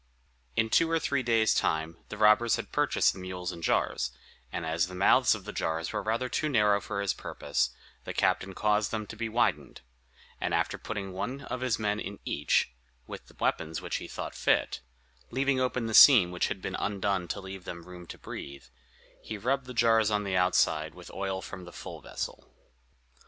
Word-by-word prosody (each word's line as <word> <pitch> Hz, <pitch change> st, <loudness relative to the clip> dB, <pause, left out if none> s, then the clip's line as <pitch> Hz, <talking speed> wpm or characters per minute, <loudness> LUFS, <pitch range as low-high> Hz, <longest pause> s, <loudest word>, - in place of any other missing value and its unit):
In 110 Hz, -1 st, +1 dB
two 165 Hz, -, +4 dB
or 165 Hz, -, +2 dB
three 140 Hz, -4 st, 0 dB
days' 115 Hz, -3 st, +3 dB
time 80 Hz, +1 st, 0 dB
the 105 Hz, -, -6 dB
robbers 110 Hz, +2 st, +5 dB
had -, -, -6 dB
purchased -, -, +2 dB
the -, -, -10 dB
mules 90 Hz, -1 st, -4 dB
and 85 Hz, -, -9 dB
jars, 65 Hz, -5 st, +1 dB, 0.4 s
and 85 Hz, -, -3 dB
as 85 Hz, +2 st, +1 dB
the 90 Hz, -, -9 dB
mouths 125 Hz, +6 st, +5 dB
of 100 Hz, -3 st, -10 dB
the 105 Hz, -, -6 dB
jars 80 Hz, +2 st, -2 dB
were 105 Hz, -, -1 dB
rather 115 Hz, +5 st, -1 dB
too 155 Hz, +4 st, -1 dB
narrow 105 Hz, -6 st, +3 dB
for 100 Hz, -2 st, -3 dB
his 100 Hz, -, +1 dB
purpose, 75 Hz, -, -1 dB, 0.3 s
the -, -, -5 dB
captain 95 Hz, 0 st, 0 dB
caused 105 Hz, 0 st, +2 dB
them 110 Hz, -1 st, -3 dB
to 110 Hz, -, -9 dB
be 115 Hz, +1 st, -3 dB
widened; 120 Hz, +2 st, 0 dB, 0.6 s
and -, -, 0 dB
after -, -, 0 dB
having 100 Hz, -3 st, -3 dB
put -, -, -9 dB
one 125 Hz, +9 st, -4 dB
of 130 Hz, -2 st, -5 dB
his 125 Hz, -3 st, +1 dB
men 105 Hz, -1 st, -1 dB
into 100 Hz, -, -6 dB
each, 70 Hz, -3 st, +1 dB, 0.3 s
with -, -, -9 dB
the -, -, -19 dB
weapons 80 Hz, +1 st, -1 dB
which -, -, -3 dB
he -, -, -7 dB
thought -, -, -6 dB
fit, -, -, +1 dB, 0.5 s
leaving 135 Hz, +1 st, +1 dB
open 125 Hz, -2 st, 0 dB
the 110 Hz, -, -3 dB
seam 110 Hz, -9 st, +9 dB
which 90 Hz, -, 0 dB
had 95 Hz, -, -5 dB
been 95 Hz, -, -3 dB
undone 100 Hz, -3 st, -1 dB
to 100 Hz, -, -3 dB
leave 95 Hz, -1 st, -8 dB
them 85 Hz, -1 st, -7 dB
room 90 Hz, -1 st, -11 dB
to -, -, -9 dB
breathe, 70 Hz, 0 st, -8 dB, 0.6 s
he 110 Hz, -, -6 dB
rubbed 125 Hz, +4 st, -1 dB
the -, -, -7 dB
jars 115 Hz, -2 st, +4 dB
on 105 Hz, -1 st, +1 dB
the 95 Hz, -2 st, -2 dB
outside 80 Hz, -4 st, +2 dB
with 90 Hz, -1 st, -11 dB
oil 95 Hz, -1 st, -3 dB
from 95 Hz, -3 st, -8 dB
the 90 Hz, -, -10 dB
full -, -, -9 dB
vessel. -, -, -6 dB
100 Hz, 205 wpm, -29 LUFS, 90-115 Hz, 0.6 s, seam